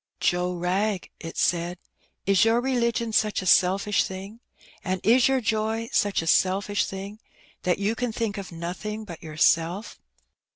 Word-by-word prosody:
"Joe 180 Hz, 0 st, +1 dB
Wrag," 185 Hz, +3 st, -1 dB
it 165 Hz, -1 st, -8 dB
said, 175 Hz, +1 st, 0 dB, 0.5 s
"is 195 Hz, +2 st, +4 dB
your 225 Hz, +1 st, +3 dB
religion 235 Hz, -3 st, 0 dB
such 215 Hz, -3 st, +1 dB
a -, -, -7 dB
selfisli 190 Hz, +2 st, +3 dB
thing, 195 Hz, +4 st, -7 dB, 0.4 s
and 185 Hz, 0 st, -1 dB
is 240 Hz, +4 st, +5 dB
your 265 Hz, -1 st, +2 dB
joy 220 Hz, +1 st, -1 dB
such 205 Hz, -5 st, +1 dB
a -, -, -6 dB
selfish 195 Hz, +4 st, +2 dB
thing, 195 Hz, +2 st, -7 dB, 0.4 s
that 180 Hz, -1 st, +1 dB
you 205 Hz, +2 st, 0 dB
can 245 Hz, 0 st, -2 dB
think 220 Hz, -2 st, -2 dB
of 195 Hz, -, -8 dB
nothing 185 Hz, +6 st, -5 dB
but 170 Hz, -5 st, -9 dB
yourself? 165 Hz, +5 st, +1 dB
200 Hz, 155 wpm, -25 LUFS, 180-220 Hz, 0.5 s, is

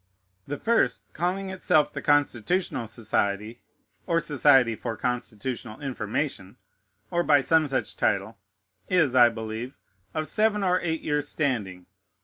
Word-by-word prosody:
The 145 Hz, -, -4 dB
first, 230 Hz, +9 st, 0 dB
calling 190 Hz, +3 st, -2 dB
itself 155 Hz, -5 st, +2 dB
the -, -, -5 dB
Constitutional 145 Hz, -, +1 dB
Society, 105 Hz, 0 st, -2 dB, 0.5 s
or 165 Hz, -2 st, +2 dB
Society 135 Hz, -6 st, +4 dB
for 115 Hz, -1 st, -5 dB
Constitutional 125 Hz, -1 st, -4 dB
Information, 125 Hz, -5 st, -4 dB, 0.5 s
or 175 Hz, -, +2 dB
by 145 Hz, -4 st, +4 dB
some 160 Hz, +2 st, +3 dB
such 135 Hz, -1 st, -2 dB
title, 100 Hz, +2 st, -1 dB, 0.5 s
is, 160 Hz, -8 st, +3 dB
I 120 Hz, -2 st, +7 dB
believe, 115 Hz, +3 st, -6 dB, 0.4 s
of 155 Hz, 0 st, -2 dB
seven 210 Hz, +5 st, +2 dB
or 185 Hz, -1 st, +2 dB
eight 160 Hz, -2 st, -2 dB
years' 145 Hz, -1 st, -1 dB
standing. 105 Hz, -, -2 dB
135 Hz, 130 wpm, -26 LUFS, 115-160 Hz, 0.5 s, I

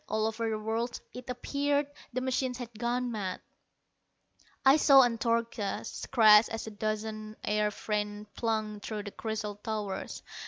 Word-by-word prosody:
All 215 Hz, +1 st, +1 dB
over 225 Hz, +1 st, -1 dB
the 220 Hz, -, -1 dB
world, 225 Hz, +3 st, -2 dB
it 250 Hz, 0 st, -9 dB
appeared, 285 Hz, +3 st, 0 dB, 0.3 s
the 255 Hz, +1 st, -2 dB
machines 255 Hz, -1 st, -1 dB
had 240 Hz, -2 st, -7 dB
gone 245 Hz, +1 st, 0 dB
mad. 195 Hz, -5 st, -3 dB, 1.3 s
I 270 Hz, +3 st, +8 dB
saw 275 Hz, -3 st, +8 dB
Antarcha 230 Hz, -3 st, 0 dB, 0.3 s
crash 215 Hz, -3 st, +8 dB
as 225 Hz, -, -4 dB
a 220 Hz, -, -6 dB
dozen 215 Hz, 0 st, -3 dB
air 210 Hz, 0 st, +1 dB
freighters 210 Hz, 0 st, -3 dB
plunged 215 Hz, -2 st, -2 dB
through 215 Hz, -2 st, -4 dB
the 205 Hz, -, -7 dB
crystal 215 Hz, -2 st, -4 dB
towers. 210 Hz, -2 st, -4 dB
220 Hz, 145 wpm, -30 LUFS, 210-245 Hz, 1.3 s, I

